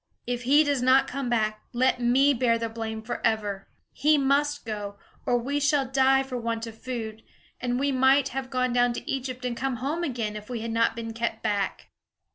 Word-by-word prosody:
If 245 Hz, 0 st, -3 dB
he 290 Hz, +4 st, +6 dB
does 285 Hz, -3 st, 0 dB
not 260 Hz, +2 st, +5 dB
come 270 Hz, -2 st, -3 dB
back, 215 Hz, -2 st, 0 dB
let 255 Hz, +1 st, +2 dB
me 260 Hz, +4 st, +4 dB
bear 235 Hz, -2 st, +2 dB
the 230 Hz, 0 st, -3 dB
blame 220 Hz, -1 st, -5 dB
forever. 215 Hz, -4 st, -2 dB, 0.3 s
He 300 Hz, +2 st, +3 dB
must 285 Hz, +1 st, +1 dB
go, 205 Hz, -2 st, -5 dB, 0.3 s
or 245 Hz, -, +3 dB
we 275 Hz, +5 st, -1 dB
shall 285 Hz, -1 st, +2 dB
die 265 Hz, +1 st, +3 dB
for 260 Hz, -2 st, -5 dB
want 230 Hz, -1 st, -2 dB
of 225 Hz, -1 st, -9 dB
food; 225 Hz, -4 st, -5 dB, 0.4 s
and 245 Hz, 0 st, -1 dB
we 280 Hz, +1 st, +1 dB
might 265 Hz, +1 st, +4 dB
have 265 Hz, -1 st, -4 dB
gone 255 Hz, -2 st, 0 dB
down 245 Hz, 0 st, +3 dB
to -, -, -7 dB
Egypt 255 Hz, -1 st, -3 dB
and 245 Hz, -1 st, -2 dB
come 265 Hz, +1 st, -2 dB
home 285 Hz, +8 st, -2 dB
again, 235 Hz, -8 st, -2 dB
if 210 Hz, +1 st, -8 dB
we 240 Hz, -3 st, -4 dB
had 230 Hz, 0 st, -4 dB
not 230 Hz, 0 st, +2 dB
been 225 Hz, -1 st, -5 dB
kept 230 Hz, -1 st, -3 dB
back." 200 Hz, -2 st, -2 dB
245 Hz, 205 wpm, -26 LUFS, 225-270 Hz, 0.4 s, he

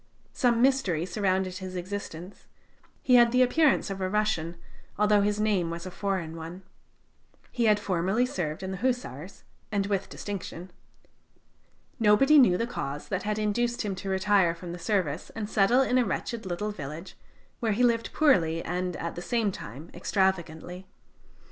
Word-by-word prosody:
Some 240 Hz, -1 st, +2 dB
mystery 230 Hz, -, +2 dB
surrounded 185 Hz, -1 st, -1 dB
his 185 Hz, -1 st, -7 dB
existence; 185 Hz, -1 st, -7 dB, 0.6 s
he 255 Hz, -, +2 dB
had 240 Hz, -1 st, +6 dB
the 250 Hz, +1 st, +5 dB
appearance 275 Hz, -3 st, +2 dB
of 195 Hz, 0 st, -5 dB
a 185 Hz, -, 0 dB
Russian, 190 Hz, -5 st, -1 dB, 0.4 s
although 210 Hz, 0 st, +4 dB
his 205 Hz, +1 st, 0 dB
name 200 Hz, -6 st, +1 dB
was 170 Hz, +1 st, -6 dB
a 185 Hz, -, -6 dB
foreign 185 Hz, -5 st, -3 dB
one. 165 Hz, +3 st, -8 dB, 0.9 s
He 240 Hz, -2 st, 0 dB
had 210 Hz, -1 st, +4 dB
formerly 195 Hz, +5 st, +1 dB
served 175 Hz, -8 st, -4 dB
in 190 Hz, -, -4 dB
the 190 Hz, -, -4 dB
Hussars, 200 Hz, -, -3 dB, 0.3 s
and 200 Hz, -2 st, 0 dB
with 200 Hz, -1 st, -2 dB
distinction. 185 Hz, -3 st, -7 dB, 1.3 s
Nobody 235 Hz, +8 st, +6 dB
knew 185 Hz, -9 st, +5 dB
the 230 Hz, -, 0 dB
cause 145 Hz, -, -5 dB
that 195 Hz, -1 st, -1 dB
had 210 Hz, 0 st, -2 dB
induced 235 Hz, +3 st, 0 dB
him 205 Hz, -2 st, -2 dB
to 195 Hz, -, -5 dB
retire 190 Hz, -2 st, +3 dB
from 170 Hz, 0 st, -8 dB
the 175 Hz, -, -7 dB
service 175 Hz, -6 st, -1 dB
and 215 Hz, -1 st, -3 dB
settle 220 Hz, +5 st, +3 dB
in 255 Hz, -1 st, +2 dB
a -, -, +4 dB
wretched 230 Hz, -2 st, -3 dB
little 210 Hz, +4 st, -2 dB
village, 155 Hz, 0 st, -8 dB, 0.4 s
where 225 Hz, -4 st, 0 dB
he 240 Hz, +5 st, +1 dB
lived 230 Hz, -1 st, +2 dB
poorly 165 Hz, -, +3 dB
and, 180 Hz, 0 st, -2 dB
at 170 Hz, +1 st, -4 dB
the 175 Hz, -, -7 dB
same 225 Hz, +1 st, 0 dB
time, 145 Hz, -, -9 dB
extravagantly. 180 Hz, -1 st, -1 dB
195 Hz, 165 wpm, -27 LUFS, 175-220 Hz, 1.3 s, had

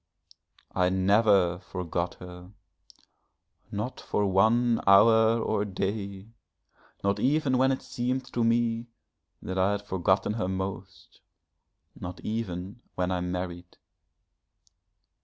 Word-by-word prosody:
I 90 Hz, -1 st, +2 dB
never 95 Hz, -2 st, +3 dB
forgot 90 Hz, -2 st, -4 dB
her, 90 Hz, 0 st, -11 dB, 1.2 s
not 105 Hz, +6 st, -4 dB
for 105 Hz, -, -1 dB
one 110 Hz, +5 st, +3 dB
hour 110 Hz, +3 st, +6 dB
or 110 Hz, -2 st, 0 dB
day, 100 Hz, 0 st, -4 dB, 0.7 s
not 100 Hz, +1 st, +1 dB
even 135 Hz, 0 st, +2 dB
when 130 Hz, +1 st, +4 dB
it 130 Hz, -, -3 dB
seemed 125 Hz, +1 st, -2 dB
to 120 Hz, -, +1 dB
me 115 Hz, 0 st, +1 dB, 0.6 s
that 95 Hz, 0 st, -3 dB
I 95 Hz, +2 st, +3 dB
had 100 Hz, 0 st, -4 dB
forgotten 95 Hz, +1 st, +1 dB
her 110 Hz, -4 st, -2 dB
most, 95 Hz, 0 st, -6 dB, 0.7 s
not 90 Hz, 0 st, -8 dB
even 100 Hz, -1 st, -4 dB
when 90 Hz, 0 st, -1 dB
I 90 Hz, -1 st, -1 dB
married. 90 Hz, -1 st, -5 dB
100 Hz, 110 wpm, -27 LUFS, 90-115 Hz, 1.2 s, hour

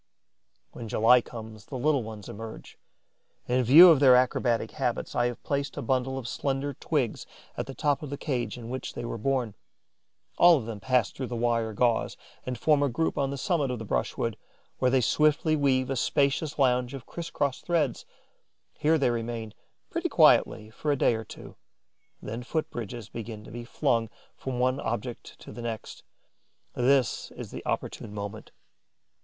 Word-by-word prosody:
When 115 Hz, -, -8 dB
July 115 Hz, +4 st, +5 dB
comes, 110 Hz, -3 st, -10 dB
the 130 Hz, -, -6 dB
little 145 Hz, +1 st, +2 dB
ones 110 Hz, -2 st, -8 dB
emerge. 110 Hz, +1 st, -9 dB, 0.7 s
In 125 Hz, +1 st, +2 dB
view 165 Hz, +9 st, +10 dB
of 155 Hz, -, +4 dB
their 130 Hz, -3 st, +7 dB
acrobatic 125 Hz, -2 st, +1 dB
habits, -, -, -2 dB
I 120 Hz, -, +2 dB
have 120 Hz, -, -6 dB
placed 140 Hz, 0 st, -2 dB
a -, -, -3 dB
bundle 130 Hz, 0 st, 0 dB
of 125 Hz, -3 st, -5 dB
slender 140 Hz, +3 st, -2 dB
twigs 135 Hz, -4 st, -2 dB, 0.3 s
at -, -, -4 dB
the 135 Hz, -, -7 dB
top 145 Hz, -2 st, +1 dB
of 150 Hz, -, -6 dB
the 140 Hz, -, -4 dB
cage 125 Hz, -7 st, -3 dB
in 120 Hz, 0 st, -8 dB
which 130 Hz, -, -5 dB
they -, -, -5 dB
were 115 Hz, -, -4 dB
born. 125 Hz, -2 st, 0 dB, 0.9 s
All 175 Hz, -2 st, +8 dB
of 125 Hz, -, -5 dB
them 110 Hz, -2 st, -6 dB
pass 125 Hz, +1 st, +1 dB
through 130 Hz, -, -5 dB
the 120 Hz, -, -5 dB
wire 115 Hz, -1 st, 0 dB
gauze 115 Hz, +1 st, +1 dB, 0.3 s
and 125 Hz, -1 st, -3 dB
form 150 Hz, +3 st, +3 dB
a 145 Hz, -, +2 dB
group 160 Hz, +7 st, -1 dB
on 140 Hz, -1 st, 0 dB
the 140 Hz, -, -4 dB
summit 150 Hz, -2 st, 0 dB
of 125 Hz, -, -2 dB
the 110 Hz, -, -7 dB
brushwood, -, -, -2 dB, 0.4 s
where 130 Hz, -, +3 dB
they 130 Hz, 0 st, +3 dB
swiftly 155 Hz, +5 st, +2 dB
weave 135 Hz, -3 st, +1 dB
a -, -, 0 dB
spacious 140 Hz, +3 st, 0 dB
lounge 125 Hz, -1 st, +2 dB
of 135 Hz, -, -9 dB
criss 170 Hz, -1 st, -6 dB
cross 140 Hz, -2 st, -1 dB
threads. 155 Hz, -8 st, 0 dB, 0.7 s
Here 160 Hz, +2 st, +2 dB
they 135 Hz, -5 st, +2 dB
remain, 115 Hz, -2 st, -4 dB, 0.4 s
pretty -, -, -1 dB
quietly, 110 Hz, 0 st, +4 dB
for 150 Hz, +6 st, -2 dB
a 140 Hz, -, +1 dB
day 120 Hz, -, +3 dB
or 110 Hz, 0 st, -3 dB
two; -, -, -12 dB, 0.6 s
then 115 Hz, +3 st, -6 dB
foot 155 Hz, +5 st, -3 dB
bridges 115 Hz, -1 st, -6 dB
begin 110 Hz, -1 st, -7 dB
to -, -, -12 dB
be 120 Hz, +1 st, -7 dB
flung 115 Hz, -2 st, 0 dB, 0.3 s
from 130 Hz, -2 st, -5 dB
one 130 Hz, +2 st, +1 dB
object 120 Hz, 0 st, -5 dB
to -, -, -10 dB
the 120 Hz, -, -8 dB
next. 115 Hz, -2 st, -6 dB, 0.7 s
This 130 Hz, -2 st, +2 dB
is -, -, -8 dB
the -, -, -7 dB
opportune -, -, -3 dB
moment. 100 Hz, -1 st, -6 dB
125 Hz, 185 wpm, -27 LUFS, 115-140 Hz, 0.9 s, view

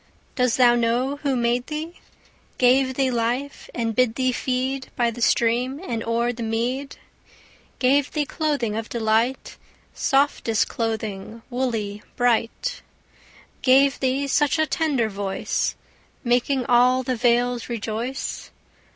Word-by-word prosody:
Does 250 Hz, -3 st, +2 dB
thou 245 Hz, -2 st, +6 dB
know 240 Hz, +4 st, +1 dB
who 280 Hz, -2 st, -1 dB
made 240 Hz, 0 st, 0 dB
thee, 315 Hz, +3 st, -6 dB, 0.6 s
Gave 260 Hz, +1 st, +3 dB
thee 265 Hz, -1 st, +1 dB
life, 245 Hz, +4 st, -2 dB
and 225 Hz, -2 st, -2 dB
bid 250 Hz, -3 st, +2 dB
thee 255 Hz, 0 st, +1 dB
feed 260 Hz, +2 st, -2 dB
By 235 Hz, -1 st, +1 dB
the 240 Hz, +1 st, -9 dB
stream 240 Hz, +4 st, +2 dB
and 230 Hz, -1 st, -2 dB
o'er 235 Hz, +1 st, 0 dB
the 235 Hz, -, -8 dB
mead; 240 Hz, +5 st, -2 dB, 0.8 s
Gave 275 Hz, +2 st, +3 dB
thee 300 Hz, -2 st, 0 dB
clothing 285 Hz, -9 st, -1 dB
of 225 Hz, 0 st, -4 dB
delight, 230 Hz, +3 st, 0 dB, 0.4 s
Softest 270 Hz, -5 st, +1 dB
clothing, 220 Hz, -1 st, -4 dB
woolly, 225 Hz, -5 st, -2 dB
bright; 245 Hz, -, 0 dB, 0.8 s
Gave 270 Hz, +1 st, +4 dB
thee 265 Hz, +1 st, 0 dB
such 295 Hz, +2 st, +2 dB
a 315 Hz, -, +3 dB
tender 295 Hz, -8 st, 0 dB
voice, 200 Hz, -2 st, -2 dB, 0.5 s
Making 250 Hz, +1 st, +1 dB
all 250 Hz, +1 st, +4 dB
the 255 Hz, 0 st, -1 dB
vales 245 Hz, +1 st, +1 dB
rejoice? 230 Hz, +3 st, -4 dB
245 Hz, 125 wpm, -23 LUFS, 230-270 Hz, 0.8 s, thou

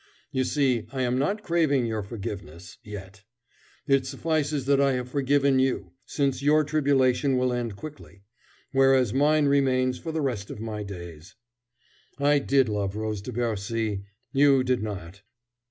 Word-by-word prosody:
You 130 Hz, -1 st, 0 dB
see, 130 Hz, -5 st, +1 dB
I 130 Hz, -2 st, -2 dB
am 125 Hz, +1 st, 0 dB
not 200 Hz, +10 st, -1 dB
craving 155 Hz, -, +2 dB
your 110 Hz, -2 st, -2 dB
forgiveness 95 Hz, -5 st, -8 dB
yet. 100 Hz, -1 st, -9 dB, 0.6 s
It 135 Hz, -2 st, +2 dB
suffices 150 Hz, 0 st, -1 dB
that 140 Hz, 0 st, +3 dB
I 140 Hz, -1 st, +3 dB
have 125 Hz, -1 st, -3 dB
forgiven 140 Hz, -1 st, +2 dB
you, 130 Hz, 0 st, 0 dB, 0.2 s
since 140 Hz, -2 st, -1 dB
your 150 Hz, +2 st, +4 dB
tribulation 140 Hz, -3 st, +2 dB
will 125 Hz, 0 st, +1 dB
end 120 Hz, -4 st, -3 dB
quickly, 95 Hz, -, -11 dB, 0.5 s
whereas 135 Hz, -4 st, +4 dB
mine 150 Hz, +2 st, +3 dB
remains 130 Hz, -2 st, +2 dB
for 165 Hz, -, -5 dB
the 160 Hz, 0 st, -2 dB
rest 120 Hz, -8 st, -2 dB
of -, -, -7 dB
my 110 Hz, -1 st, -5 dB
days. 85 Hz, -2 st, -9 dB, 0.8 s
I 145 Hz, 0 st, +3 dB
did 135 Hz, -2 st, +2 dB
love 100 Hz, -2 st, -2 dB
Rose 110 Hz, -2 st, -3 dB
de 115 Hz, -, -7 dB
Bercy: 110 Hz, -2 st, -2 dB, 0.3 s
you 135 Hz, -1 st, +5 dB
did 125 Hz, -2 st, 0 dB
not.... 100 Hz, -3 st, -6 dB
130 Hz, 155 wpm, -26 LUFS, 105-140 Hz, 0.8 s, you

